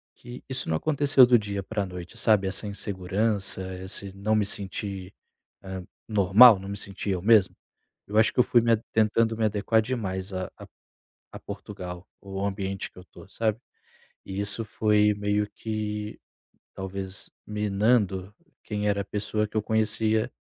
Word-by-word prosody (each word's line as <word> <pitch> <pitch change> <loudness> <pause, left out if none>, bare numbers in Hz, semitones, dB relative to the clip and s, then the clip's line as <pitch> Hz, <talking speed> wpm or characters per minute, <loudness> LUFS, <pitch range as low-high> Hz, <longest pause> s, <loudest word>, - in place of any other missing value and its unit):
que 120 +1 -11
isso 130 0 -3
não 80 - +1
aconteceu 145 - +5
do 120 -2 +5
dia 100 -1 -4
para 100 0 -2
noite, 90 -1 -9
sabe? 105 -3 +3
Essa 100 +2 0
insegurança, 100 0 -1 0.2
esse 95 +1 -5
não 110 +2 0
me 105 -2 +2
sentir, 95 -1 -3 0.5
hã, 95 -1 -6 0.2
normal, 105 +2 +7
não 95 +1 -9
me 100 - -4
sentir 100 0 -5
eu 90 -2 0
mesmo. 105 -2 +4 0.5
Eu 105 +1 +1
acho 110 - +4
que - - +1
eu - - +9
fui 120 -2 +4
me 115 0 +2
a 115 - +5 0.2
tentando 110 +1 +2
me 115 - 0
adequar 110 +1 +2
demais 100 -5 -3
a 95 0 -4
a - - -10 0.7
a - - -9
Portugal, 90 0 -8 0.2
o 100 0 -4
ambiente 95 -1 -3
que - - -26
eu 90 - -9
estou, 90 - -15
sabe? 110 0 -1 0.7
E 95 +1 -5
isso 100 +3 -1
foi 105 0 +3
meio 105 0 0
que, 105 -1 -4 0.5
talvez 95 0 -6 0.2
minando 105 -2 +1 0.3
quem 105 -1 -2
era 100 0 +1
a - - -6
pessoa 105 +1 -2
que 105 - -20
eu - - +2
conhecia 110 0 +1
105 Hz, 165 wpm, -26 LUFS, 95-110 Hz, 0.7 s, eu